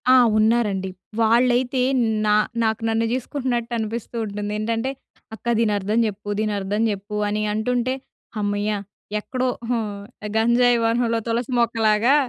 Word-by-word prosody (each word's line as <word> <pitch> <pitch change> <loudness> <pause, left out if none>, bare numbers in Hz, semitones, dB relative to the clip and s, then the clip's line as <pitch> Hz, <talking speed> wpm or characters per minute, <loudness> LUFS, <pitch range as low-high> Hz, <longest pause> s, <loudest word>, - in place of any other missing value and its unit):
ఆ! 255 - +8 0.2
ఉన్నారండి. 215 -4 +2 0.3
వాళ్ళైతే 245 +3 +3 0.4
నా 210 0 +4 0.3
నాకు 220 0 0
నన్ను 225 +1 +1
జూసుకుంటున్నట్టు 250 -2 -2
అనిపిస్తూ 225 +1 -4
ఉంటుంది. 205 0 -4
ఏంటంటే, 225 +3 -1 0.5
"అక్క 220 - -22
దీని 220 -2 +2
అర్థం 205 +3 0
జెప్పు, 205 -1 -5
దీని 215 -1 0
అర్థం 200 +2 -1
జెప్పు" 205 +1 -4
అని 210 +1 -1
అంటుంటే 245 +3 0 0.4
హమ్మయ్య! 205 0 0 0.5
ఎక్కడో 255 +4 -2 0.2
హ్మ్, 215 -4 -2 0.4
గంజాయి 240 +2 +4
వనంలో 230 0 +1
తులసి 235 +2 -1
మొక్కలాగా 225 +2 +3
225 Hz, 125 wpm, -22 LUFS, 210-240 Hz, 0.5 s, ఆ